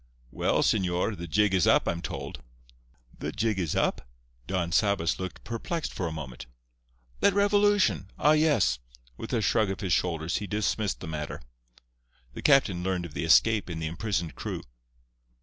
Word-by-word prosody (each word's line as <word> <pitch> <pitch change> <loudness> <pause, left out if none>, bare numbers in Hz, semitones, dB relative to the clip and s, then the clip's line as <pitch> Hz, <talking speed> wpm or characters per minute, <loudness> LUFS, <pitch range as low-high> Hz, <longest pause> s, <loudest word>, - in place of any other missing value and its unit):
"Well, - - +1
señor, 90 +3 +1
the 85 -2 -7
jig 105 +4 +2
is 90 -3 +3
up, - - +4
I'm 85 - -1
told." - - -6 0.8
"The - - -3
jig 110 -2 -1
is 85 -5 -1
up?" - - 0 0.4
Don 90 -2 -1
Sabas 100 -3 +1
looked 95 0 -6
perplexed 120 - -4
for 90 - -2
a - - -4
moment. 70 -6 -7 0.7
"That 200 - +3
revolution—ah, 205 - +3
yes!" 150 - +3 0.4
With 115 - -7
a 115 -4 0
shrug 110 +1 +2
of 95 - -4
his 95 -4 0
shoulders 80 -1 0
he 105 - -5
dismissed 105 0 -1
the - - -6
matter. 75 -2 -5 0.9
The - - -7
captain 130 -11 +4
learned 90 -1 -1
of 80 - -10
the - - -2
escape 105 +6 +4
and 80 -2 -4
the 80 - -3
imprisoned 85 -1 -2
crew. - - -5
95 Hz, 165 wpm, -28 LUFS, 85-110 Hz, 0.9 s, up